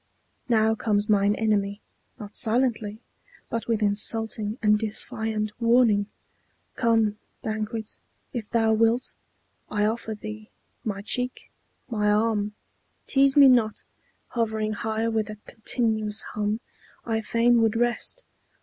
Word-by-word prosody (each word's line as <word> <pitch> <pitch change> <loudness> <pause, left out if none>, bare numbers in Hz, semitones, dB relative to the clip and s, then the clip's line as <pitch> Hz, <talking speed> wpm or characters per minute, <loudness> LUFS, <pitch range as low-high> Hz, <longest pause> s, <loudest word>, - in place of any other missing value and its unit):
Now 220 -1 +4
comes 210 -2 0
mine 205 -1 +3
enemy, 205 -2 0 0.4
not 205 -1 -9
silently, 225 -3 +2 0.5
But 230 -1 -3
with 225 -2 +1
insulting 215 +1 +1
and 210 -1 +3
defiant 215 0 -3
warning; 230 -4 +4 0.7
Come, 225 -3 +2 0.2
banquet, 220 0 -4 0.3
if 230 -5 -5
thou 225 -1 +2
wilt; 230 +3 +2 0.6
I 210 0 +1
offer 220 0 -2
thee 215 0 -8 0.3
My 200 -2 -3
cheek, 250 +3 -4 0.4
my 210 -4 0
arm. 210 -1 +1 0.5
Tease 275 0 +3
me 280 -1 +9
not, 235 -5 +3 0.5
hovering 220 -2 -1
high 220 +1 -2
With 220 -2 0
that 210 -1 -10
continuous 220 -2 0
hum; 210 +2 -1 0.4
I 225 -1 0
fain 235 +1 +3
would 225 -1 +2
rest. 240 - -1
220 Hz, 120 wpm, -25 LUFS, 210-230 Hz, 0.7 s, me